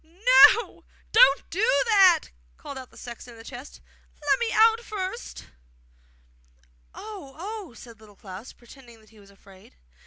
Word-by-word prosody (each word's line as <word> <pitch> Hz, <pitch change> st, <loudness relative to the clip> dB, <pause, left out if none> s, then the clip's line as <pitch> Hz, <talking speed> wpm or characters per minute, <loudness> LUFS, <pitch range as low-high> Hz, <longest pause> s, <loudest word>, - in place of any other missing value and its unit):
'No, 445 Hz, +8 st, +4 dB, 0.3 s
don't -, -, +4 dB
do 445 Hz, +8 st, +1 dB
that!' 390 Hz, -6 st, +4 dB, 0.3 s
called 280 Hz, -, -10 dB
out 260 Hz, -1 st, -10 dB
the -, -, -20 dB
sexton 240 Hz, 0 st, -11 dB
in -, -, -17 dB
the 225 Hz, -, -13 dB
chest. 245 Hz, +5 st, -12 dB, 0.4 s
'Let 295 Hz, -, 0 dB
me 475 Hz, -, -1 dB
get -, -, -3 dB
out 450 Hz, +1 st, +5 dB
first!' 425 Hz, 0 st, -7 dB, 1.5 s
'Oh, 395 Hz, -11 st, -11 dB
oh!' 390 Hz, -, -8 dB
said 230 Hz, 0 st, -14 dB
Little 210 Hz, -2 st, -18 dB
Klaus, 195 Hz, +4 st, -11 dB
pretending 240 Hz, -1 st, -18 dB
that 215 Hz, -, -24 dB
he 220 Hz, -, -20 dB
was 200 Hz, -1 st, -19 dB
afraid. 195 Hz, -1 st, -20 dB
295 Hz, 155 wpm, -24 LUFS, -, 1.5 s, out